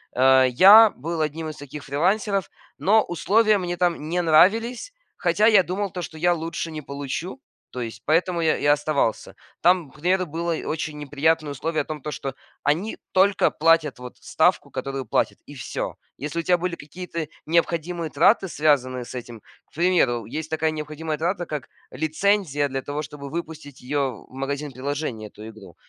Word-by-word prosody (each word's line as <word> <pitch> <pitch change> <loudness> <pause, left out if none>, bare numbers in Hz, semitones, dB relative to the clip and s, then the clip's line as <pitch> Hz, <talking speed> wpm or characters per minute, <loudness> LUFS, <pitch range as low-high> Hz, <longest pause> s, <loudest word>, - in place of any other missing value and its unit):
э, 130 0 +6
я 205 - +8
был 160 +3 -4
одним 155 +1 -2
из 155 - -8
таких 145 +1 -9
фрилансеров, 195 +7 0 0.3
но 215 +3 +4
условия 210 +5 +2
мне 175 -1 -3
там 170 -3 0
не 175 +1 +1
нравились. 225 - +3 0.2
Хотя 215 - +2
я 205 -5 +6
думал 190 +2 -3
то, 180 - -5
что 160 -1 -8
я 175 +2 +3
лучше 165 0 -4
не 155 -1 -6
получу, 140 - -5 0.3
то 125 - -6
есть 115 -1 -7
поэтому 170 +2 +1
я 160 - +2
я - - -8
и - - -2
оставался. 145 -5 +1 0.3
Там, 175 -4 +3
к - - -22
примеру, 185 +3 +1
было 170 +2 -3 0.2
очень 155 -1 -3
неприятное 150 +1 0
условие 155 +3 -2
о - - -22
том, 150 -3 -6
то 150 - -5
что 135 -2 -5 0.3
они 165 +10 0 0.2
только 195 0 +4
платят 160 -4 +2
вот 125 0 -10
ставку, - - +1
которую 135 -1 -4
платят, - - 0
и - - -12
всё. - - -4 0.2
Если 150 +4 -4
у - - +1
тебя 180 +1 +3
были 175 0 -3
какие-то 165 0 -6 0.2
необходимые 170 0 0
траты, 190 +6 +4
связанные 130 -6 +1
с - - -10
этим, 120 -2 -7 0.3
к - - -36
примеру, 155 - +2
есть 155 +7 -5
такая 160 0 0
необходимая 155 0 -4
трата, 175 +3 -1
как 150 -3 -6 0.2
лицензия 160 -2 0
для 135 -1 -3
того, 145 +2 -4
чтобы 140 -1 -8
выпустить 155 -4 -7
её 135 -3 -2
в - - -20
магазин 140 +2 -4
приложения, 130 -4 -4
эту - - -16
игру. 105 -6 -13
155 Hz, 180 wpm, -23 LUFS, 140-175 Hz, 0.3 s, я